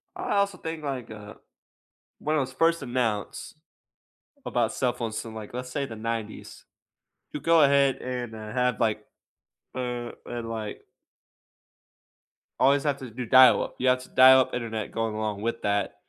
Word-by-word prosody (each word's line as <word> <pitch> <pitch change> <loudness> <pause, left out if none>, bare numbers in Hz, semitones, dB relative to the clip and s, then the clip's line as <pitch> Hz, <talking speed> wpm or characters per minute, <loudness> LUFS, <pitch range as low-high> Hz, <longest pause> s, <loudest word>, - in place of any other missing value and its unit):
I - - -3
also 200 -2 +1
think, 160 -2 -6
like, 130 -5 -4
uh, 105 0 -10 0.8
when 155 +1 -1
it - - +2
was 130 -1 -3
first 165 +3 +2
announced 120 -5 -2 0.9
about 115 -2 0
cell 125 -2 0
phones 115 -2 -4
in, 115 -1 -9
like, 110 0 -9
let's 125 0 -5
say, 140 0 -2
the 115 - -8
'90s. 110 -1 -6 0.7
You 150 - -5
go 165 -2 +4
ahead 140 -1 +4
and, 125 -3 -5
uh, 110 -1 -8
have, 125 -2 0
like 110 -2 0 0.7
uh, 125 -2 -4
and, 120 -1 -5
like 110 -2 -5 1.8
always 140 +2 +4
have 145 -2 0
to 130 -4 -8
do 125 +2 -6
dial-up 130 +2 +6
you 130 - 0
have 125 0 +3
to - - -15
dial-up 130 0 +6
internet, 110 -3 -4
going 115 -1 -2
along 105 -2 -3
with 115 +1 -2
that. 100 -1 0
125 Hz, 160 wpm, -26 LUFS, 110-135 Hz, 1.8 s, dial-up